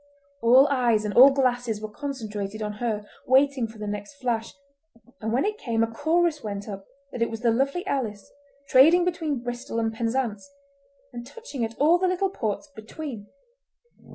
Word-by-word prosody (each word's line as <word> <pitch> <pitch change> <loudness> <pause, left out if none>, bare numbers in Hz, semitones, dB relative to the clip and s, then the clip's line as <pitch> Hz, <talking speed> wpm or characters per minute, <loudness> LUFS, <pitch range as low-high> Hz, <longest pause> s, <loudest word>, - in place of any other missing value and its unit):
All 255 +4 +6
eyes 235 -5 +2
and 205 - -2
all 260 +7 +9
glasses 245 -5 0
were 215 - -5
concentrated 215 -4 -5
on 210 0 -3
her, 215 -3 -2 0.2
waiting 265 -2 +3
for 220 0 -14
the 210 - -6
next 205 +5 -5
flash, 240 -4 -2 0.7
and 220 0 -3
when 255 +9 +1
it 425 +1 -2
came 230 -2 0
a 230 - -2
chorus 320 +3 +1
went 205 -1 -5
up 195 -2 -8 0.2
that 240 - -6
it 230 - +2
was 225 0 -6
the 235 -1 +3
Lovely 275 - 0
Alice, 225 - -3 0.4
trading 325 +8 +6
between 315 -8 -2
Bristol 240 -1 -5
and 225 -1 -1
Penzance, 230 +1 -2 0.6
and 240 0 -6
touching 280 - -7
at 225 0 -4
all 330 +5 +4
the 375 - +2
little 370 +1 0
ports 220 - -3
between. 225 -1 -8
240 Hz, 175 wpm, -25 LUFS, 220-280 Hz, 0.7 s, all